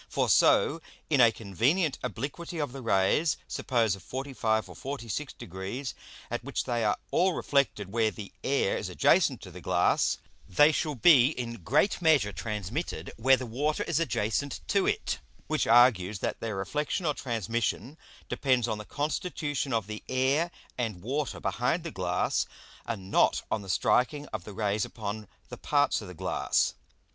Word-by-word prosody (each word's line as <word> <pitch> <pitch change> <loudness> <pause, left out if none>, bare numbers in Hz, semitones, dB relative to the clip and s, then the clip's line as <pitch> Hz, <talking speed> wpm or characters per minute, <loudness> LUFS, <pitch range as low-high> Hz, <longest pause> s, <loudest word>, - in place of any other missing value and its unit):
For - - 0
so 165 +3 +4 0.3
in 140 -4 +5
a 115 -2 +7
convenient 125 - 0
obliquity 140 +8 -5
of 145 -4 -2
the 135 +1 -8
Rays, 115 - +2
suppose 115 -6 +1
of 95 - -13
45 125 -2 -1
or - - -10
46 135 0 -4
Degrees, 95 +9 -6 0.4
at - - -3
which - - -2
they 120 -1 -1
are 105 - +2
all 185 +1 +3
reflected 135 - 0
where 110 0 +2
the 100 0 -9
Air 135 -7 +1
is - - -4
adjacent - - +3
to - - -10
the - - -10
Glass, - - +2 0.3
they 145 - +6
shall 150 -1 -1
be 130 -1 +7
in 120 - -4
great 150 - +2
measure 150 -11 +4
transmitted 105 - -4
where 130 +4 +5
the 130 - -5
Water 145 +7 -1
is 165 - 0
adjacent 120 -1 -1
to 200 -1 +2
it; 430 - -1 0.3
which 155 -1 0
argues, 115 -5 +5
that - - -3
their 115 -2 -3
Reflexion 150 - -2
or 150 - +2
Transmission 115 - -2 0.3
depends 130 -4 +1
on 110 -2 -2
the 105 - -7
constitution 145 - -2
of 115 -4 0
the 105 +1 -7
Air 135 +6 +2 0.3
and 110 -7 -3
Water 140 +5 -2
behind 125 - 0
the 165 - -5
Glass, 90 -4 0 0.4
and 100 -5 -5
not - - +3
on 110 - 0
the 95 - -10
striking 130 +9 +2
of 90 - -5
the 105 - -8
Rays 105 0 0
upon 105 -1 -5 0.2
the - - -7
parts 145 -4 +2
of 105 - -8
the 90 - -9
Glass. 90 +2 0
120 Hz, 170 wpm, -29 LUFS, 105-145 Hz, 0.4 s, a